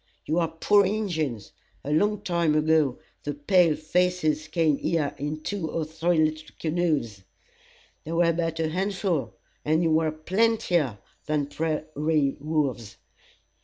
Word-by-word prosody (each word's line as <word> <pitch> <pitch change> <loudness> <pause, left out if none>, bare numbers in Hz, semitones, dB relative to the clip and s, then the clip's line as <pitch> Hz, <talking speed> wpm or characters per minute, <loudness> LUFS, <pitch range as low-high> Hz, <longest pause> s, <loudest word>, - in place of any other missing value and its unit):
You 160 +3 +1
are 165 - +2
poor 200 +5 +3
Injins. 165 - -2 0.3
A 145 - -4
long 205 +6 +2
time 170 -3 +1
ago, 155 -4 +2 0.3
the 145 -1 -3
pale 165 +2 +3
faces 155 -2 0
came 155 -2 +2
here 155 -4 -1
in 150 +2 -3
two 195 -6 -3
or 160 0 -2
three 160 +2 0
little 155 0 -3
canoes. 155 - -1 0.8
They 160 - -7
were 170 0 +3
but 165 -1 -2
a 160 -1 0
handful, 180 - -1 0.3
and 160 +3 +2
you 165 - +2
were 160 0 +2
plentier 175 - +1 0.3
than 150 -2 +1
prairie 155 -2 -1
wolves. 140 -8 -2
160 Hz, 135 wpm, -26 LUFS, 150-175 Hz, 0.8 s, poor